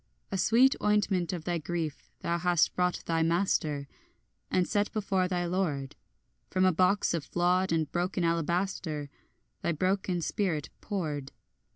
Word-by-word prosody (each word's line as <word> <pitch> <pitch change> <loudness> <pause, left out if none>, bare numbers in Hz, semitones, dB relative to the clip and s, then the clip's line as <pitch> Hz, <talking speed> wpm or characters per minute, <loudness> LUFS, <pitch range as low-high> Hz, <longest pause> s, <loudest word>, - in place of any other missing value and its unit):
And 195 - -1
sweet 240 +8 +5
ointment 200 -4 +2
of 175 -4 -4
thy 175 0 -1
grief 160 -1 -4
thou 170 0 0
hast 175 -1 +3
brought 180 0 0
thy 165 -1 +1
master, 160 -4 +1 0.6
And 180 -1 +2
set 205 0 0
before 195 -3 +1
thy 180 -1 -1
lord, 165 -7 -1 0.5
From 185 0 +2
a 185 - +5
box 185 +3 +2
of 165 -3 -1
flawed 180 +4 +1
and 160 -1 +2
broken 180 +1 -1
alabaster, 165 -3 -1 0.5
Thy 170 - 0
broken 185 +2 0
spirit, 165 -5 -1
poured. 150 -9 -3
175 Hz, 145 wpm, -29 LUFS, 165-190 Hz, 0.6 s, sweet